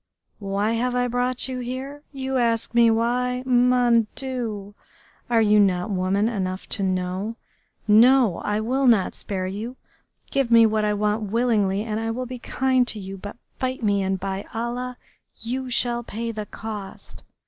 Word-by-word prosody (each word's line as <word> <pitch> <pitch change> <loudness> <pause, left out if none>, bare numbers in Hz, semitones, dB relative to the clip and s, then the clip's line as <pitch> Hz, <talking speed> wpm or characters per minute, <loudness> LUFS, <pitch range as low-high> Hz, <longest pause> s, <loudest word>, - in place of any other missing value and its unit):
Why 200 +1 -1
have 245 +2 0
I 245 0 +1
brought 245 +1 -1
you 255 -1 -4
here? 260 +4 -5
You 265 -1 -2
ask 230 -2 0
me 235 -1 +6
why? 250 +2 0
Mon 245 -2 +4
Dieu! 230 -7 -4 0.6
Are 230 -2 +4
you 210 0 +5
not 185 0 +2
woman 195 +2 +1
enough 190 -4 -3
to 205 - -1
know? 185 +3 -1 0.5
No! 230 -2 +6
I 210 +1 -1
will 260 +4 +1
not 215 -6 +4
spare 190 -2 -4
you. 210 +7 -5 0.6
Give 275 -3 +1
me 230 -1 +7
what 215 -1 +1
I 210 0 +1
want 210 0 0
willingly 210 -4 +1
and 215 -1 -3
I 225 0 -2
will 250 +3 -3
be 250 0 -7
kind 260 0 +1
to 215 - -3
you, 195 0 -7
but 205 +3 -9 0.2
fight 255 -2 -2
me, 200 -2 +2
and 190 0 -1
by 195 +1 -3
Allah! 245 +2 -3 0.4
you 255 +3 -4
shall 240 -1 +1
pay 230 0 -4
the 215 -2 -6
cost!... 210 -3 -8
230 Hz, 170 wpm, -24 LUFS, 205-250 Hz, 0.6 s, me